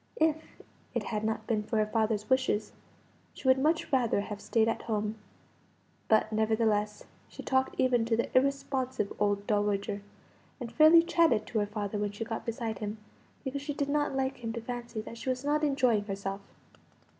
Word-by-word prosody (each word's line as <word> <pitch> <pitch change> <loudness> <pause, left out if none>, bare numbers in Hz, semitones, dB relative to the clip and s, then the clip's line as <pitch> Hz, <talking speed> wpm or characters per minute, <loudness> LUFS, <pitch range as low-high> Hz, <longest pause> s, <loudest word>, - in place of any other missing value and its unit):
If 315 0 0 0.3
it - - 0
had 215 -2 -3
not 220 +1 -2
been 220 -3 0
for 220 +2 -2
her 215 - +3
father's 215 -1 0
wishes 255 -5 +1 0.6
she - - -6
would 260 0 +5
much 315 +3 +1
rather 240 -6 +2
have 205 0 -6
stayed 225 -1 +2
at 225 - -1
home; 210 -1 -2 0.9
but, 220 0 +3
nevertheless, 215 -1 +1 0.3
she - - -9
talked 260 0 +1
even 250 -3 +3
to 225 -1 +1
the 235 - -2
irresponsive 260 -4 0
old 205 -1 +1
dowager, 205 -1 0 0.6
and 240 -3 -6
fairly 315 +2 +7
chatted 335 -10 +3
to 220 - -1
her 205 - 0
father 205 0 -3
when 205 0 -2
she 225 +2 -4
got 225 +1 -5
beside 225 -2 -3
him, 210 +1 -4 0.5
because 275 0 -3
she 290 0 -4
did 280 -1 -1
not 290 -1 0
like 265 0 -1
him 230 -2 -4
to 235 - -4
fancy 240 -1 -5
that 230 +1 -9
she 260 - -4
was 255 +1 -2
not 300 +1 +1
enjoying 255 -7 +2
herself. 195 0 -4
225 Hz, 180 wpm, -30 LUFS, 210-265 Hz, 0.9 s, fairly